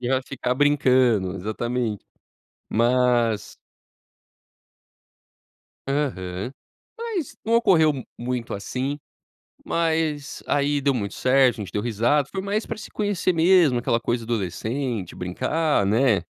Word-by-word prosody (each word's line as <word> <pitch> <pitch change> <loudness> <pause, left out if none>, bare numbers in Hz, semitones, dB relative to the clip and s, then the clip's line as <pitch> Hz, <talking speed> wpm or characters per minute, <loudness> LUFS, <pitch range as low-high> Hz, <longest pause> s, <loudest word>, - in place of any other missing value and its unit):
E 120 - -3
ela 130 0 +1
ficar 130 -1 -2
brincando, 130 -9 +3
exatamente. 110 +2 -3 0.6
Mas 120 -2 +2 2.3
Aham. 120 -7 -2 0.5
Mas 450 - -4
não 230 - +3
ocorreu 175 -9 +5
m 130 -3 -7
muito 120 -1 -3
assim, 130 +8 -3 0.7
mas 160 -3 -1
aí 145 0 +1
deu 140 0 +2
muito 100 -5 -3
certo, 130 -1 +4
a 105 - -5
gente - - -11
deu 105 - -1
risada, 120 +5 +1
foi 195 - -3
mais 205 +2 -2
pra - - -4
se - - -10
conhecer 205 -3 0
mesmo, 165 -5 +4
aquela 115 -1 0
coisa 120 0 -1
adolescente, 110 0 -3
brincar, 125 - 0
né, 110 +1 +3
125 Hz, 120 wpm, -24 LUFS, 115-150 Hz, 2.3 s, ocorreu